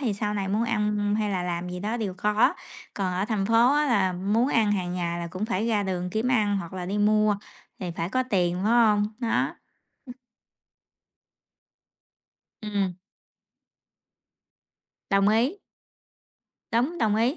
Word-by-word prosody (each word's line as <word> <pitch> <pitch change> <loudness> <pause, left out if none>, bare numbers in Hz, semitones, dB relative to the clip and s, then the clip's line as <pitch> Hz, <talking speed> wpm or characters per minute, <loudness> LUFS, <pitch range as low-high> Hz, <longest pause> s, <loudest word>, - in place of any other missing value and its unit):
Thì 240 -7 0
sau 210 +1 -2
này 195 -2 -2
muốn 210 +4 +1
ăn, 210 -2 0
ừm, 205 0 0
hay 210 -1 0
là 185 -2 -1
làm 175 0 -3
gì 180 0 -6
đó 215 +4 -2
đều 210 -5 -3
có. 210 - +2 0.4
Còn 185 -2 -2
ở 185 +2 0
thành 210 -3 -1
phố 235 +5 +4
á 300 0 +2
là 200 -8 +2
muốn 205 +8 +1
ăn 220 -6 +2
hàng 180 -3 -2
ngày 170 -1 -2
là 170 - -4
cũng 185 +5 -4
phải 220 -1 -1
ra 215 -3 +1
đường 180 -2 -3
kiếm 220 +6 -1
ăn 210 -5 +2
hoặc 170 -4 -5
là 185 -1 -5
đi 200 +3 -2
mua, 210 0 +3 0.4
thì 180 - -4
phải 165 0 -3
có 255 +6 +1
tiền, 175 -4 +2
phải 215 - +1
hông? 215 -3 +4
Đó. 235 -3 0 0.5
Ừm. 250 - -9 2.5
Ừm. 200 -4 -1 2.1
Đồng 195 0 +4
ý. 235 - +2 1.2
Đúng, 260 +10 +1
đồng 215 -5 +2
ý. 240 +7 +1
210 Hz, 165 wpm, -26 LUFS, 185-225 Hz, 2.5 s, phố